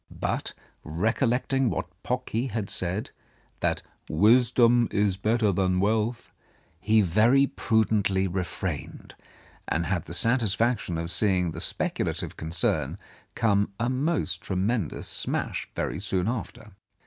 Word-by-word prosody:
But, - - -3 0.3
recollecting 120 - 0
that - - -2 0.2
Pocky 125 0 -2
had 110 -6 -3
said 95 +4 -1 0.5
that - - 0 0.3
"Wisdom 120 +5 +4
is 100 -2 +1
better 110 +2 +1
than 90 -1 +1
wealth," 110 +4 0 0.5
he 110 +4 +3
very 110 +10 +4
prudently 105 -6 +1
refrained, 90 -2 -5 0.5
and 85 +1 0
had 90 -3 -1
the 85 - -1
satisfaction 115 -2 +2
of 85 +1 -2
seeing 90 -1 +2
the - - -5
speculative - - -2
concern 80 0 0 0.4
come 100 -3 +1
a 120 +2 0
most 150 +6 -1
tremendous 95 - -2
smash - - -3
very - - -2
soon 95 -1 -1
after. 110 -2 -5
105 Hz, 115 wpm, -26 LUFS, 90-120 Hz, 0.5 s, Wisdom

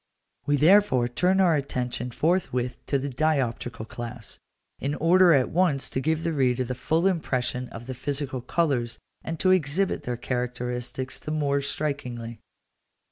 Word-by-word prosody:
We 145 0 +3
therefore 155 -6 +5
turn 180 +10 +1
our 175 -4 +5
attention 125 -3 -2
forthwith 125 -4 -1
to 140 - +2
the 135 +1 -3
dioptrical 125 -5 -1
class, 120 -2 -7 0.4
in 140 +2 -2
order 175 +3 +5
at 135 -5 +3
once 165 -6 +1
to - - -1
give 160 +2 0
the 165 - 0
reader 130 -3 +2
the 125 +1 -3
full 160 +7 0
impression 130 -8 0
of 115 +1 -9
the 130 - -5
physical 135 0 -3
colours, 125 -6 0 0.3
and 165 -1 -5
to 185 - +3
exhibit 185 +2 +1
their 120 -1 -3
characteristics 125 +1 -3
the - - -8
more 145 -2 +1
strikingly. 125 -6 -4
135 Hz, 150 wpm, -26 LUFS, 125-160 Hz, 0.4 s, therefore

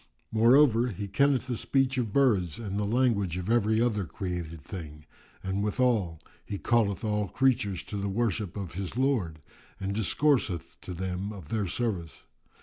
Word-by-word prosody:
Moreover, 120 +1 +5
he 100 -3 -4
kenneth 135 +6 +2
the 125 -1 -2
speech 135 +3 +1
of 115 -4 -2
birds 100 - +2
and 100 -3 -3
the 105 - 0
language 105 -6 +1
of 90 +4 -2
every 110 -2 +3
other 110 -4 +1
created 85 -2 -5
thing; 75 -4 -8 0.4
and 95 +1 -1
withal, 105 -7 +1 0.2
he 100 - -5
calleth 105 -4 +1
all 105 -1 0
creatures 115 -6 +1
to 105 - -6
the 100 0 -2
worship 105 -2 -1
of 95 -4 -5
his 95 +4 -5
Lord 110 - 0 0.4
and 95 0 -2
discourseth 110 - +1
to 90 - -7
them 95 +3 -3
of 95 -8 -10
their 105 -3 -1
service. 90 - -3
105 Hz, 160 wpm, -28 LUFS, 95-120 Hz, 0.4 s, Moreover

